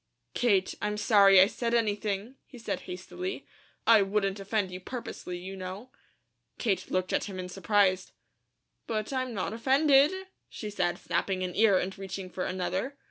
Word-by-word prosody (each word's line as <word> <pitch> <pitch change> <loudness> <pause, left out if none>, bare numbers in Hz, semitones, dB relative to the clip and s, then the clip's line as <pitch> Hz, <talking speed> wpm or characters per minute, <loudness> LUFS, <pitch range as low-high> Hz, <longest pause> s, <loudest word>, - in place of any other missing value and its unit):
"Kate, 200 -6 +2
I'm 210 0 -1
sorry 200 -2 +6
I 185 - +9
said 235 +3 -2
anything," 210 0 -1
he 255 - -13
said 230 - -3
hastily. 365 - -5 0.4
"I 225 -2 +7
wouldn't 195 0 0
offend 195 -1 -1
you 180 - -6
purposely, 185 -4 -6
you 190 +2 -7
know." 190 +6 -7 0.7
Kate 195 -6 -1
looked 185 0 -1
at - - +1
him 195 -2 -7
in 185 -1 -4
surprise. 195 -1 +1 0.8
"But 215 +3 -2
I'm 255 -1 -1
not 195 +2 -2
offended," 275 +5 +4 0.4
she 210 -2 -6
said, 175 -3 0
snapping 185 +2 -1
an 180 -1 -4
ear 210 -3 +5
and 190 +1 -2
reaching 190 -1 -6
for 180 - -3
another. 185 +9 -3
200 Hz, 160 wpm, -29 LUFS, 185-230 Hz, 0.8 s, I